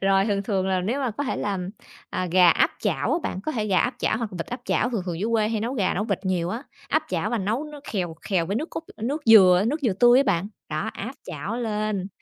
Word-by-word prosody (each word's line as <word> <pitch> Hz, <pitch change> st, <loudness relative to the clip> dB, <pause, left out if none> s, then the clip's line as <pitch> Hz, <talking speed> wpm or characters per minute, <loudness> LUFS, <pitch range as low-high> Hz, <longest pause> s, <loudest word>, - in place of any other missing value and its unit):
Rồi 195 Hz, 0 st, +3 dB
thường 200 Hz, -2 st, 0 dB
thường 195 Hz, -3 st, -1 dB
là 185 Hz, -1 st, +1 dB
nếu 230 Hz, +10 st, -1 dB
mà 260 Hz, -3 st, 0 dB
có 255 Hz, +7 st, -4 dB
thể -, -, -2 dB
làm, 190 Hz, -2 st, -2 dB, 0.4 s
à, 185 Hz, -, -2 dB
gà 180 Hz, -1 st, +7 dB
áp -, -, +3 dB
chảo -, -, 0 dB
á -, -, +2 dB
bạn, 185 Hz, -, -3 dB
có 310 Hz, -, -3 dB
thể 220 Hz, -6 st, -1 dB
gà 195 Hz, -3 st, +3 dB
áp 245 Hz, -, 0 dB
chảo 220 Hz, -, 0 dB
hoặc 230 Hz, -3 st, -3 dB
vịt 170 Hz, -2 st, -5 dB
áp 245 Hz, +1 st, -6 dB
chảo, 245 Hz, -, +1 dB
thường 225 Hz, -6 st, -2 dB
thường 170 Hz, -2 st, -3 dB
dưới 220 Hz, -, -1 dB
quê 215 Hz, -2 st, +2 dB
hay 225 Hz, -2 st, -1 dB
nấu 235 Hz, +4 st, -2 dB
gà 200 Hz, -8 st, +1 dB
nấu 205 Hz, -, -1 dB
vịt -, -, -1 dB
nhiều 180 Hz, -3 st, 0 dB
á. 235 Hz, +7 st, -4 dB, 0.3 s
Áp -, -, +2 dB
chảo -, -, -1 dB
và 235 Hz, -, 0 dB
nấu 215 Hz, +8 st, -1 dB
nước 300 Hz, -1 st, -10 dB
khèo 175 Hz, -5 st, -2 dB
khèo 180 Hz, -5 st, 0 dB
với 200 Hz, +5 st, -1 dB
nước 310 Hz, +6 st, -3 dB
cốt -, -, -5 dB
nước 275 Hz, +8 st, -3 dB
dừa 190 Hz, -4 st, +7 dB
nước 295 Hz, +7 st, -1 dB
dừa 235 Hz, -7 st, +2 dB
tươi 240 Hz, +6 st, +6 dB
á -, -, +5 dB
bạn. 195 Hz, +1 st, +1 dB, 0.2 s
Đó, -, -, -2 dB
áp -, -, -6 dB
chảo 230 Hz, -, -5 dB
lên. 215 Hz, -4 st, -2 dB
210 Hz, 275 wpm, -24 LUFS, 185-240 Hz, 0.4 s, gà